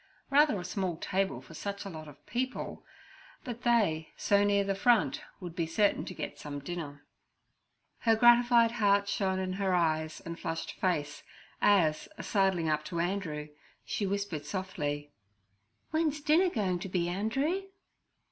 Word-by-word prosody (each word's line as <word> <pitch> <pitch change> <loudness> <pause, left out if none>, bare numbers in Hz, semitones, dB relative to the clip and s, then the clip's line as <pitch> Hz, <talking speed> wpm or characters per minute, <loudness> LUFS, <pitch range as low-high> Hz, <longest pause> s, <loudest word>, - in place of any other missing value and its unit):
Rather 290 -6 +5
a 180 - -6
small 180 -2 -2
table 190 +3 -1
for - - -13
such 200 +5 -5
a - - -4
lot 155 -2 -8
of 145 -1 -15
people; 255 +2 -3 0.6
but 240 -2 -6
they, 205 -11 +2
so 200 0 +3
near 200 0 +3
the 195 0 0
front, 245 +8 +3 0.2
would 175 -3 -7
be 165 -2 -1
certain 205 +5 +2
to 185 - -7
get - - -6
some 145 -1 -6
dinner. 145 -1 -6 0.9
Her 225 -1 +3
gratified 240 0 +6
heart 200 -3 +3
shone 190 -2 0
in 185 0 -2
her 190 -2 +2
eyes 160 -2 0
and 170 +1 -7
flushed 165 -2 -3
face, 150 -6 -1 0.4
as, 165 -7 +3
sidling 190 -5 +1
up 155 -1 +1
to 170 -2 -3
Andrew, 170 -5 -2 0.4
she 200 - -2
whispered 200 -6 -2
softly, 145 -5 -3 0.8
'Wen's 315 -2 +1
the 290 - -20
dinner 345 +5 +5
goin' 190 - -1
to 195 +1 -6
be, 180 -2 0
Andree?' 270 - -1
190 Hz, 155 wpm, -30 LUFS, 165-220 Hz, 0.9 s, gratified